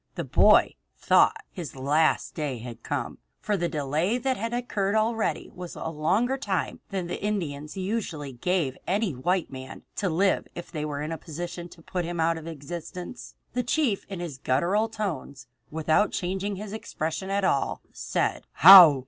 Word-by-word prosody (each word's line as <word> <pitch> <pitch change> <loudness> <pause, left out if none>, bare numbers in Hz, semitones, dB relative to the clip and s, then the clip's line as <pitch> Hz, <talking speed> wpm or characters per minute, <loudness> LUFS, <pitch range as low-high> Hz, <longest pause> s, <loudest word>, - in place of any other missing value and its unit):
The - - -2
boy - - +5 0.2
thought - - +4 0.2
his 170 -8 -7
last 145 +4 +2
day 145 -5 -3
had 120 0 -8
come, - - -3 0.2
for 210 - 0
the 175 -3 0
delay 155 - 0
that 260 +1 0
had 230 +1 -3
occurred 220 -4 -1
already 220 0 0
was 180 -1 -8
a - - -4
longer 195 - +1
time 195 -9 -2
than 190 -3 -2
the 175 - -5
Indians 160 -7 -3
usually 185 - -3
gave 155 0 0
any 200 -2 +1
white 170 +7 0
man 130 0 -8
to 195 - 0
live 190 +4 +2
if 175 - -8
they 150 -2 -3
were 145 -1 -3
in 155 - -4
a 165 - -4
position 175 +1 -6
to 165 -1 -16
put 180 +1 -2
him 170 0 -4
out 165 0 +2
of 160 - -10
existence. 170 - -7 0.2
The 250 - +1
chief 245 -4 0
in 195 -3 -5
his 150 -7 -6
guttural 180 +14 +1
tones, 160 - -4 0.2
without 160 +6 +2
changing 190 +3 -2
his 205 +1 -7
expression 190 -3 -4
at 200 0 0
all, 140 - +1
said: - - -2
"How?" 170 -4 +10
175 Hz, 175 wpm, -27 LUFS, 155-200 Hz, 0.2 s, How